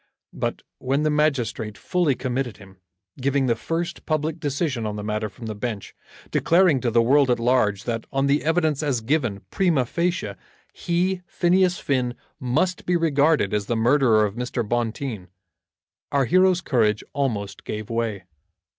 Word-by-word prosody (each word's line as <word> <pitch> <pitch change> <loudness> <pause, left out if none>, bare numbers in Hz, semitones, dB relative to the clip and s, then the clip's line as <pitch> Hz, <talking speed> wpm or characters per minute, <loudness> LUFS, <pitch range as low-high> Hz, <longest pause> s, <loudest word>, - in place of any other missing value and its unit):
But - - -3 0.2
when 135 +3 0
the 155 - +2
magistrate 125 -8 0
fully 175 -7 +1
committed 125 -3 -3
him, 95 -2 -15 0.4
giving 140 +1 +1
the 120 -2 +2
first 170 +7 -3
public 155 +1 -1
decision 140 -4 -1
on 105 - -4
the 105 - -5
matter 105 0 -2
from 115 +4 -11
the 110 - -3
bench, 105 -1 -5 0.4
declaring 170 -6 +3
to 125 - +1
the 115 0 +3
world 135 +2 +4
at 120 - +3
large 115 -5 +2
that 115 -2 -3
on 135 0 +1
the 140 +1 +2
evidence 160 -2 +1
as 140 -6 0
given, 120 -5 0
prima 170 -9 +2
facie, 170 - -1 0.4
he, 180 +2 -1
Phineas 180 0 +2
Finn, 125 -3 -1 0.2
must 155 +9 -1
be 180 - +2
regarded 155 - +2
as 105 -1 -1
the 120 - 0
murderer 115 -2 +4
of 100 - -3
Mr. 120 -1 -3
Bonteen, 115 -3 -2 0.8
our 140 -2 +2
hero's 185 +3 +4
courage 110 -9 +1
almost 105 -8 -2
gave 110 +1 -5
way. 115 -5 -2
130 Hz, 160 wpm, -23 LUFS, 115-155 Hz, 0.8 s, world